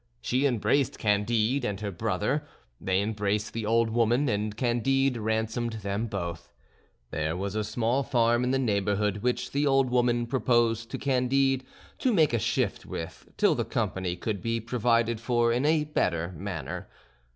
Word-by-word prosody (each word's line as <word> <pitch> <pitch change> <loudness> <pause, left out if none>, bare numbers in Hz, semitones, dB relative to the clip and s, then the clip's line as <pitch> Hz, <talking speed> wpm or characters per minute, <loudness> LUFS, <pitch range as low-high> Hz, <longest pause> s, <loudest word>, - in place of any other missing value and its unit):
She 130 +4 +1
embraced 130 +2 +1
Candide 110 +5 +1
and 100 -5 -2
her 100 -1 -3
brother; 85 - -1 0.4
they 95 +1 +1
embraced 105 0 -1
the 110 -2 -3
old 115 0 +2
woman, 120 +4 +2
and 105 0 -2
Candide 130 +2 +1
ransomed 110 +1 -1
them 105 +1 -3
both. 85 -4 -5 0.6
There 80 +2 -2
was 100 +1 -3
a 110 0 -1
small 115 +5 0
farm 120 -2 +2
in 125 - 0
the 135 - +2
neighbourhood 105 -4 0
which 125 +4 -1
the 145 +1 +1
old 135 -2 +3
woman 120 -1 +2
proposed 115 -2 +1
to - - -4
Candide 135 0 +1 0.4
to 255 - +2
make 155 -7 +4
a 115 - +2
shift - - -1
with 80 - -7
till - - +4
the - - -1
company 90 -2 -2
could 100 +1 -3
be 115 +2 -1
provided 115 0 +1
for 120 -1 +2
in 125 +5 +1
a 155 -1 +3
better 85 - -1
manner. 90 -2 -5
115 Hz, 160 wpm, -27 LUFS, 105-125 Hz, 0.6 s, make